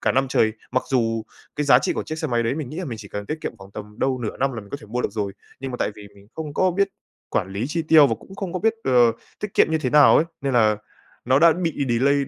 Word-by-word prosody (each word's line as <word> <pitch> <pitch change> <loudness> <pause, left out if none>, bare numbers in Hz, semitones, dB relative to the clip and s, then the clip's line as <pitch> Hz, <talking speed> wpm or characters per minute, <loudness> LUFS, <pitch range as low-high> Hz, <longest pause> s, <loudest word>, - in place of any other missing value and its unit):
cả - - +1
năm 135 +1 +1
trời. 110 -3 +2 0.2
Mặc 130 - +1
dù 115 -3 +1 0.3
cái 150 - 0
giá 140 - +7
trị - - -1
của - - -3
chiếc 155 0 -6
xe 155 - -2
máy 120 -1 +1
đấy, 115 +3 0
mình 150 -5 -4
nghĩ 155 - -8
là 185 - -3
mình 115 -7 -6
chỉ 105 - -10
cần 105 0 -6
tiết 155 +1 -4
kiệm - - -5
khoảng 95 0 -13
tầm 105 +1 -10
đâu 130 -1 0
nửa 115 -3 -4
năm 135 0 0
là 115 - -5
mình 100 - -15
có - - -3
thể - - -13
mua 125 +4 -2
được - - -2
rồi, 105 -3 -3 0.3
nhưng 135 - -4
mà 125 - -4
tại - - 0
vì 105 -1 -11
mình 100 0 -18
không 150 -2 -6
có 185 - +3
biết 200 +3 +1 0.4
quản 95 - 0
lý 100 +4 -2
chi 165 +2 -1
tiêu, 155 -2 +7
và - - 0
cũng 195 - -13
không 190 -4 -4
có 185 - -2
biết, 225 +4 +2
ờ, 120 -3 +5 0.3
tiết 210 -2 -5
kiệm - - +5
như 160 - +2
thế 130 -4 -2
nào 150 -1 +7
ấy, 160 - +4 0.2
nên 135 -1 -1
là 110 -3 +4 0.5
nó 130 +2 +4
đã 165 +2 +7
bị 165 -5 -2
delay 130 +4 +3
130 Hz, 310 wpm, -23 LUFS, 115-155 Hz, 0.5 s, giá